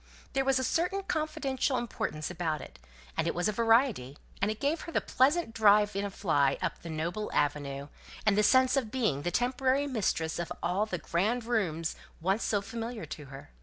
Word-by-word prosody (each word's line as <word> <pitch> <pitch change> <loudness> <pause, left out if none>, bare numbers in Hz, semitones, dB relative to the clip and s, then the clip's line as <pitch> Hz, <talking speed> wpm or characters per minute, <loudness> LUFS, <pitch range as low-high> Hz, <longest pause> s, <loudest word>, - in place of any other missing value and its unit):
There 270 - +2
was 270 0 +3
a 260 - 0
certain 360 +9 0
confidential 280 -5 -1
importance 155 -10 -3
about 165 -3 -2
it, - - -11 0.4
and 160 +1 0
it - - -1
was 175 +3 +1
a - - +2
variety, 225 - +2 0.2
and 200 - +2
it 215 0 -3
gave 290 +4 0
her 335 - -7
the - - +2
pleasant 275 0 +2
drive 210 -2 +5
in 200 - 0
a 200 - -2
fly 145 -8 +1
up - - -3
the 170 - -8
noble 170 +7 -3
avenue, 140 -1 -1 0.4
and 215 -2 +4
the 210 - +4
sense 260 +5 +5
of 260 -5 0
being 215 - 0
the 175 - -1
temporary 255 +5 +1
mistress 190 - -1
of 170 - -4
all 195 +5 +1
the 185 - -2
grand 205 +9 0
rooms 170 -9 -1 0.2
once 195 +6 +1
so 205 -2 0
familiar 225 +1 -5
to 150 - -8
her. 135 - -11
210 Hz, 200 wpm, -30 LUFS, 165-255 Hz, 0.4 s, drive